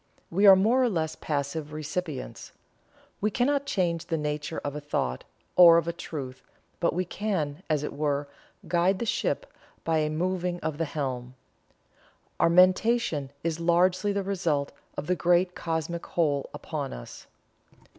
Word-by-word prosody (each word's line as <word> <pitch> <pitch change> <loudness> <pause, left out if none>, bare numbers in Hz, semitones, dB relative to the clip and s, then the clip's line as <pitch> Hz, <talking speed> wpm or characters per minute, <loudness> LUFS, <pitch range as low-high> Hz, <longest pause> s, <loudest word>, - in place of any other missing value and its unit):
We 200 +4 +4
are 195 - +11
more 225 +7 +3
or 250 - +3
less 160 -5 -1
passive 150 +1 -3
recipients. 155 -1 -5 0.7
We 210 - +2
cannot 280 +6 +1
change 170 - 0
the 165 - 0
nature 150 +1 -3
of 145 0 -4
a 150 - -4
thought, 105 - -2 0.3
or 170 -2 +9
of 170 0 0
a 170 - -1
truth, 135 -6 -7 0.4
but 170 - +1
we 180 +1 0
can, 175 -7 -2
as 150 -2 +1
it - - -4
were, 145 -1 -1 0.4
guide 175 +3 +2
the 235 - -3
ship 365 - -1 0.4
by 160 -1 +1
a 155 0 +1
moving 180 +2 -1
of 155 -1 -3
the 165 - +1
helm. 130 -4 -4 1.0
Our - - +4
mentation 185 - +3
is 165 0 -1
largely 180 +4 +3
the 200 0 -1
result 165 -7 -1 0.3
of - - -3
the 180 - +1
great 180 +1 +2
Cosmic 165 0 -3
Whole 145 -5 0
upon - - -5
us." - - -10
165 Hz, 155 wpm, -27 LUFS, 150-185 Hz, 1.0 s, are